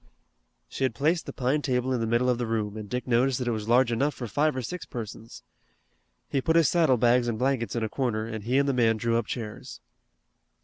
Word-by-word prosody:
She - - -5
had 130 - 0
placed 160 +4 0
the - - -4
pine 135 +4 0
table 130 -2 0
in 120 - -1
the 115 - -1
middle 120 +3 +2
of 125 -1 +1
the 120 - -2
room, 110 -2 -2
and 105 -2 -7
Dick 125 +3 -3
noticed 125 +1 +2
that 125 - -3
it - - +1
was 110 -2 -4
large 120 0 +4
enough 140 +5 0
for 125 - -5
five 145 +5 +1
or 130 - -3
six 180 +8 -5
persons. 115 -1 -8 0.8
He 135 - -1
put 160 +4 +1
his 165 -2 +5
saddle 160 -7 +3
bags 120 +1 +3
and 115 -2 -1
blankets 125 -1 0
in 115 - -1
a - - 0
corner 110 -2 -2
and 110 -2 -6
he 125 +4 +1
and 140 0 +3
the 140 - +1
man 115 -3 +3
drew 115 +1 +1
up 110 - -5
chairs. 110 -4 -6
125 Hz, 245 wpm, -27 LUFS, 115-135 Hz, 0.8 s, his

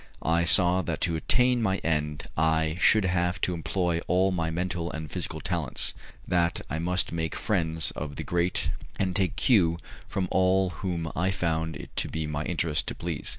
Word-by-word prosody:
I 85 +2 +2
saw 90 +1 +6
that 85 - -3
to 85 - +1
attain 125 +8 +2
my 95 -3 +1
end 75 -2 -1
I 80 0 +2
should 110 +1 +5
have 90 0 0
to 90 - 0
employ 85 0 -1
all 95 +2 +3
my 85 -3 -1
mental 85 0 -2
and 80 -3 -6
physical - - -4
talents, - - -2 0.3
that 85 -1 +1
I 75 - -1
must 90 +2 0
make 80 -1 -2
friends 80 -7 0
of 75 -1 -6
the - - -5
great, 85 -2 0 0.3
and 95 -2 -1
take 95 -2 +1
cue 85 -9 +3 0.3
from 95 -2 -2
all 95 0 +3
whom 85 -2 -3
I 90 +3 +1
found 80 -3 -1
it - - -10
to - - +2
be 80 0 -3
my 75 -1 -3
interest 85 -2 0
to - - -3
please. 85 -3 -3
85 Hz, 185 wpm, -27 LUFS, 80-95 Hz, 0.3 s, saw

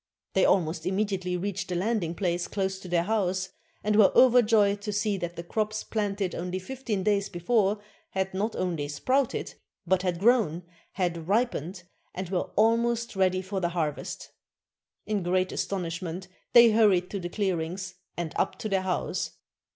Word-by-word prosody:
They 190 - +4
almost 165 -2 +1
immediately 190 -2 -1
reached 185 0 -3
the 180 - -1
landing 180 -3 0
place 175 -2 -1
close 190 -1 -2
to 190 - -10
their 170 -1 +2
house, 185 -2 0 0.3
and 210 0 +1
were 210 -2 +6
overjoyed 220 -5 +5
to 210 - -3
see 210 0 0
that 175 -2 -4
the 170 - -6
crops 215 +4 -2
planted 200 -3 -2
only 180 +1 -3
fifteen 220 0 -3
days 200 -1 +1
before 200 +3 +1 0.3
had 190 0 -2
not 210 +4 -1
only 170 -6 -2
sprouted, 255 - 0 0.3
but 185 +1 +2
had 180 -2 -1
grown, 205 -6 +3 0.3
had 170 -3 -2
ripened, 195 - 0 0.3
and 185 -1 -4
were 180 - -1
almost 230 +1 +2
ready 185 -1 +2
for 190 +1 -3
the 175 -2 0
harvest. 160 -4 -3 0.7
In 210 -2 -1
great 185 +1 +1
astonishment 180 -1 -3 0.3
they 235 -1 +9
hurried 200 -5 +3
through 200 - -3
the 175 -1 -5
clearings, 185 -1 -2 0.2
and 170 -2 -3
up - - 0
to 215 - -4
their 195 -1 +1
house. 185 -1 -2
190 Hz, 160 wpm, -27 LUFS, 180-210 Hz, 0.7 s, they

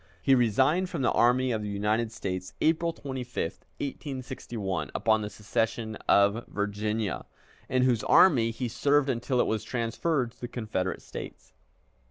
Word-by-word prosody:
He 135 - +5
resigned 130 - +3
from 165 -7 -3
the - - +3
Army 125 +2 +3
of 110 -2 -1
the 105 - -4
United 105 +3 0
States, 95 -3 -4
April 165 +1 +2
25, 130 -6 -7 0.4
1861, 120 - -4
upon 110 -1 +2
the 105 - -4
secession 110 +1 -2
of 100 +3 +4
Virginia, 105 0 -2 0.4
in 130 0 +2
whose 125 -4 +2
army 125 -11 +6
he 115 +2 -3
served 145 +4 +2
until 125 +1 0
it - - +4
was 110 -1 -1
transferred 125 +2 -1
to - - -28
the 120 - -3
Confederate 105 -6 -3
States. - - -9
115 Hz, 150 wpm, -28 LUFS, 105-130 Hz, 0.4 s, army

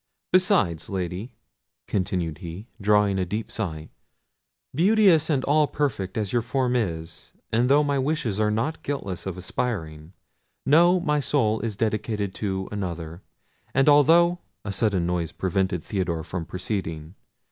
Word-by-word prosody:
Besides, 185 - +3
Lady," 95 +5 -4 0.5
continued 90 -5 -2
he, 90 +3 -7 0.2
drawing 105 -1 +3
a - - +1
deep 105 +5 -4
sigh, 80 -8 -4 0.8
"beauteous 180 -1 +4
and 140 -4 +1
all 150 +1 +3
perfect 110 -12 -2
as 105 -3 -2
your 120 - +3
form 125 +1 0
is, 85 -9 -3 0.2
and 120 +3 +2
though 145 +2 +5
my 140 -1 0
wishes 135 -7 -1
are 105 -1 +2
not 115 +9 -1
guiltless 100 -11 -4
of 95 -1 -4
aspiring, 90 -6 -4 0.5
know, 175 +5 +5
my 150 -4 +1
soul 110 -6 +1
is 110 -2 -4
dedicated 105 -2 -1
to 95 -2 -3
another; 85 -4 -5 0.5
and 135 +1 +3
although—" 165 +4 +5 0.3
A 100 - -2
sudden 100 -4 +1
noise 85 -2 -1
prevented 95 -2 -1
Theodore 85 -5 -2
from 85 0 -5
proceeding. 85 -4 -4
105 Hz, 140 wpm, -25 LUFS, 90-140 Hz, 0.8 s, though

